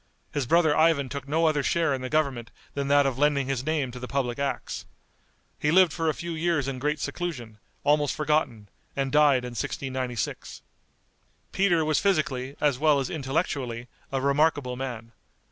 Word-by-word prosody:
His 145 -4 -2
brother 160 -1 +4
Ivan 155 -4 +3
took 140 0 -6
no 160 +3 +1
other 155 -2 +2
share 160 +1 +1
in 130 - -3
the 130 - -4
government 135 -6 0 0.2
than 140 -1 -2
that 145 0 +4
of 135 -2 -1
lending 145 -2 +2
his 130 -1 -2
name 150 -4 -1
to 125 - -8
the 125 - -6
public 130 -2 -2
acts. 140 -1 -3 0.7
He 150 - +1
lived 180 -1 +5
for 165 -2 0
a - - +1
few 170 0 -5
years 165 -4 0
in 135 -2 -3
great 150 +3 -1
seclusion, 140 -7 -5 0.2
almost 145 0 +2
forgotten, 150 -8 0 0.3
and 135 -1 -1
died 145 -4 +4
in 125 - -5
1696. 130 -1 -4 0.9
Peter 175 -5 +2
was 155 -1 +2
physically, 140 -9 0
as 145 -4 +1
well 150 -2 +4
as 135 - -3
intellectually, 135 -5 -2 0.2
a 135 - 0
remarkable 140 -1 +1
man. 120 -3 -6
140 Hz, 175 wpm, -26 LUFS, 130-155 Hz, 0.9 s, lived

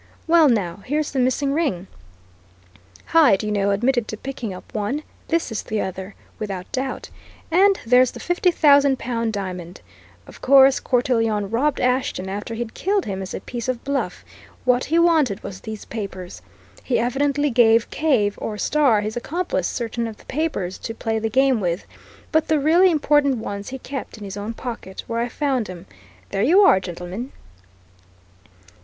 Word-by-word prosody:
Well, 325 -3 +5
now, 190 -7 0
here's 295 +9 -2
the 275 - -1
missing 260 +2 +1
ring! 280 - -1 1.2
Hyde, 290 -13 +4
you 210 - -2
know, 200 -1 +1
admitted 240 +3 +1
to 215 - -5
picking 260 -3 -5
up 185 - -11
one 220 +8 -2 0.2
this 335 -6 0
is 225 - -2
the 215 - -3
other, 190 +1 -5 0.2
without 195 -4 -5
doubt. 265 +1 -4 0.4
And 390 +3 +4
there's 250 +2 +5
the - - -10
fifty 355 +1 +1
thousand 285 -5 +4
pound 230 -3 -2
diamond. 185 -4 -6 0.4
Of - - -14
course, 270 0 +6
Cortelyon 225 -5 0
robbed 275 +5 +1
Ashton 250 -7 0
after 205 +3 -5
he'd 230 0 -5
killed 395 +1 0
him 195 -1 -4
as 190 - -5
a - - -6
piece 240 -1 -6
of 250 -2 -2
bluff 280 0 -3 0.4
what 250 0 +3
he 325 - +1
wanted 315 - +3
was 190 -1 -7
these 220 -1 -7
papers. 190 - -7 0.4
He 250 - 0
evidently 280 +4 +1
gave 230 -1 +4
Cave, 245 -10 +1
or 210 - -4
Starr, 265 -3 +2
his 215 +1 -4
accomplice, 255 - -2
certain 235 0 -3
of 220 -2 -8
the - - -19
papers, 260 - -3
to 225 - -6
play 225 -1 -2
the 225 0 -1
game 265 0 +3
with, 175 0 -2 0.5
but 315 -1 +2
the 310 -1 +2
really 335 +6 +5
important 290 -4 +2
ones 205 -2 -5
he 265 - -5
kept 265 -2 -7
in 210 - -10
his 195 -1 -6
own 210 +3 -5
pocket, 230 -7 -7
where 230 0 -3
I 240 +1 -1
found 260 -5 -1
'em. 180 -2 -9 0.5
There 195 - -1
you 345 - +5
are, 285 - +6
gentlemen." 185 +7 -7
240 Hz, 175 wpm, -22 LUFS, 205-280 Hz, 1.2 s, course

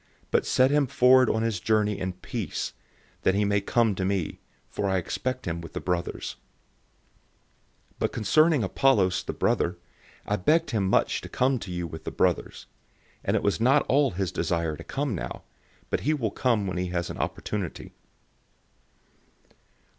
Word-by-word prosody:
But - - +2
set 130 +1 +4
him 145 -2 +3
forward 130 -1 +5
on 110 0 +1
his 115 -5 -1
journey 105 0 +1
in 90 0 -2
peace, 90 - -4 0.5
that 95 - +2
he 105 +1 +2
may 100 0 +2
come 115 +1 +2
to 95 - -3
me; 95 -3 -1 0.3
for 100 - -2
I 95 - +2
expect 130 +8 -3
him 85 -2 -3
with 85 - -10
the - - -3
brothers. 90 -2 -3 1.6
016:012 - - -25
Now - - +3
concerning 150 - +3
Apollos, 95 -3 +2
the - - -5
brother, 85 +1 0 0.5
I 105 0 -1
strongly 150 - +4
urged 165 0 -1
him 100 -4 0
to - - 0
come 130 0 +1
to 95 - -7
you 90 -1 -3
with 80 -1 -8
the - - -2
brothers; - - -1 0.6
and - - +1
it - - 0
was 100 +2 +1
not 135 +5 +4
at - - -21
all 140 +1 +4
his 95 -2 -2
desire 85 -2 -1
to - - -10
come 140 -3 -2
now; 90 - -5 0.5
but - - +1
he 155 +3 +1
will 115 -8 -2
come 115 -4 +1
when 95 -1 -3
he 90 0 -1
has 85 -1 -2
an - - -8
opportunity. 100 -5 -4
100 Hz, 175 wpm, -26 LUFS, 90-130 Hz, 1.6 s, forward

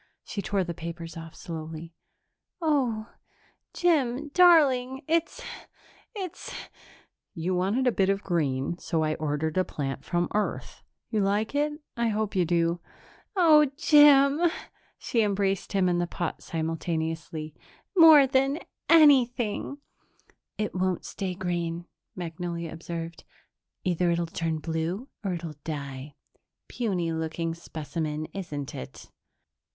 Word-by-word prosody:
She 205 - -4
tore 195 -1 0
the 170 -1 -4
papers 165 0 -7
off 165 -1 -9
slowly. 165 -1 -7 0.7
"Oh, 255 -9 0 0.6
Jim, 295 -5 +1
darling, 280 -7 +5
it's 330 +1 0 0.7
it's 375 -5 -6 0.4
" - - -27 0.3
"You 175 +2 -1
wanted 195 +8 +1
a 250 - +4
bit 195 -3 +2
of 195 0 0
green, 150 -2 -1
so 160 -1 -1
I 155 0 +1
ordered 155 +2 -1
a - - +4
plant 135 -5 -4
from 175 0 0
Earth. 210 0 -2 0.3
You 220 - +1
like 205 +4 0
it? 295 +1 +1 0.2
I 235 0 +1
hope 215 -1 -1
you 180 -2 +3
do." 170 0 +1 0.6
"Oh, 315 -5 +7
Jim!" 295 -2 +6 0.6
She 230 - 0
embraced 200 -2 0
him 190 -2 +3
and 175 -1 +2
the 175 - -1
pot 175 0 -4
simultaneously. 160 -1 -3 0.4
"More 320 -5 +9
than 270 +2 +2 0.3
anything!" 265 -6 +4 0.8
"It 210 0 -2
won't 185 -1 -1
stay 185 -2 -4
green," 175 -2 -2 0.3
Magnolia 170 -1 -5
observed. 165 0 -6 0.6
"Either 180 -1 +1
it'll 170 0 +1
turn 165 -1 -2
blue 165 - -3
or 195 -3 -1
it'll 160 -3 -7
die. 140 -2 -6 0.5
Puny 185 -8 -1
looking 160 +1 -2
specimen, 155 -1 -4
isn't 150 -8 -5
it?" 65 - -9
180 Hz, 125 wpm, -27 LUFS, 165-245 Hz, 0.8 s, More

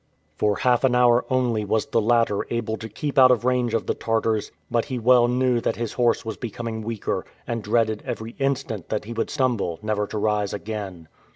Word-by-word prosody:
For 105 -1 +1
half 125 +2 +2
an 130 -2 +3
hour 125 0 +4
only 125 -4 +1
was 105 +1 0
the 115 - +1
latter 115 -2 +2
able 115 -1 -1
to 110 0 -8
keep 140 +6 -1
out 130 -1 +8
of 125 -2 +2
range 125 -2 +1
of 115 - -1
the - - 0
Tartars, 115 -1 -1 0.2
but 115 -1 +1
he 130 -3 -4
well 120 +1 +5
knew 125 -1 +1
that - - -1
his 115 -2 -4
horse 120 -2 +1
was 110 -1 -4
becoming 115 -1 -5
weaker, 110 -1 -3 0.2
and 115 -1 -3
dreaded 110 0 +1
every 110 +1 -5
instant 130 -8 -2
that 105 -1 -2
he 115 - -6
would 115 - -2
stumble 120 - 0
never 105 -1 -1
to 110 - -5
rise 105 -1 0
again. 100 -6 -6
115 Hz, 205 wpm, -24 LUFS, 110-125 Hz, 0.2 s, out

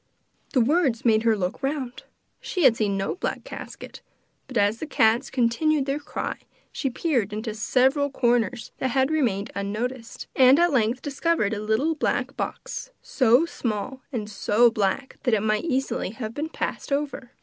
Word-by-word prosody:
The 260 - +4
words 265 -3 +2
make 220 -2 +4
her 225 -1 +2
look 185 +3 -3
round 270 -3 -3 0.4
she 365 - -2
had 255 -4 +7
seen 205 -3 0
no 195 0 -1
black - - -3
casket, - - -9 0.5
but 255 -2 -4
as 205 +2 +2
the 315 - -5
cats 235 -1 +2
continued 265 +4 +1
their 275 +1 -1
cry 290 - -4 0.3
she 270 - -2
peered 245 - 0
into 215 +1 -4
several 265 +6 +2
corners 240 -4 0
that 260 - 0
had 265 +2 +1
remained 230 -10 0
unnoticed, 225 +5 -4
and 260 +1 +7
at 345 -1 +3
length 240 0 +1
discovered 290 -6 0
a 210 - -3
little 220 +10 +1
black 310 - -1
box, - - -5
so 255 +4 +4
small 240 -4 -4
and 220 -6 -3
so 215 +3 +3
black, 220 +5 -1
that 245 -4 +2
it 205 - -1
might 215 +5 +1
easily 270 - -1
have 220 +1 -6
been 300 +4 -3
passed - - -4
over. 280 -3 -2
245 Hz, 170 wpm, -25 LUFS, 220-275 Hz, 0.5 s, had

